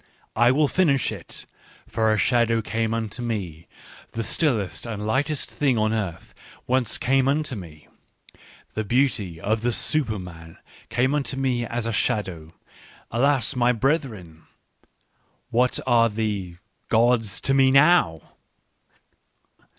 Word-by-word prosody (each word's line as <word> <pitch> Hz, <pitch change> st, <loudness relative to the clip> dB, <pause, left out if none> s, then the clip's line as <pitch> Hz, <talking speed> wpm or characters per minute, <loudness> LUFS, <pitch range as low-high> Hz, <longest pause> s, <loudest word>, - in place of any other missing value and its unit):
" -, -, -37 dB
I 120 Hz, +2 st, +4 dB
will 145 Hz, +4 st, +3 dB
finish 140 Hz, -6 st, +2 dB
it: -, -, -6 dB, 0.4 s
for 110 Hz, -1 st, 0 dB
a 110 Hz, -, +2 dB
shadow 115 Hz, 0 st, +2 dB
came 115 Hz, +1 st, -1 dB
unto 115 Hz, +1 st, -4 dB
me 95 Hz, -9 st, -4 dB, 0.2 s
— -, -, -20 dB
the 115 Hz, -, -2 dB
stillest 115 Hz, -, -1 dB
and 105 Hz, -2 st, -5 dB
lightest 140 Hz, +6 st, -1 dB
thing 135 Hz, -5 st, +1 dB
on 110 Hz, 0 st, +1 dB
earth 95 Hz, -7 st, -4 dB, 0.3 s
once 125 Hz, -3 st, +1 dB
came 135 Hz, +1 st, +2 dB
unto 145 Hz, -1 st, 0 dB
me! 80 Hz, -6 st, -11 dB, 0.4 s
" -, -, -25 dB
The 110 Hz, -, -2 dB
beauty 110 Hz, -7 st, 0 dB
of 110 Hz, +5 st, -1 dB
the 120 Hz, +1 st, +1 dB
Superman 90 Hz, -, -2 dB, 0.3 s
came 130 Hz, +4 st, +1 dB
unto 140 Hz, -2 st, -1 dB
me 125 Hz, -3 st, 0 dB
as 115 Hz, 0 st, -3 dB
a 115 Hz, -, -2 dB
shadow. 95 Hz, -9 st, -2 dB, 0.6 s
Alas, 130 Hz, +1 st, +2 dB
my 125 Hz, 0 st, +3 dB
brethren! 110 Hz, -, -2 dB, 1.0 s
What 125 Hz, +2 st, +2 dB
are 120 Hz, -2 st, +4 dB
the 105 Hz, -5 st, -3 dB, 0.2 s
— -, -, -46 dB
gods 115 Hz, -2 st, +2 dB
to 135 Hz, -, +1 dB
me 135 Hz, -1 st, +5 dB
now 135 Hz, -, +4 dB
115 Hz, 140 wpm, -24 LUFS, 105-130 Hz, 1.0 s, me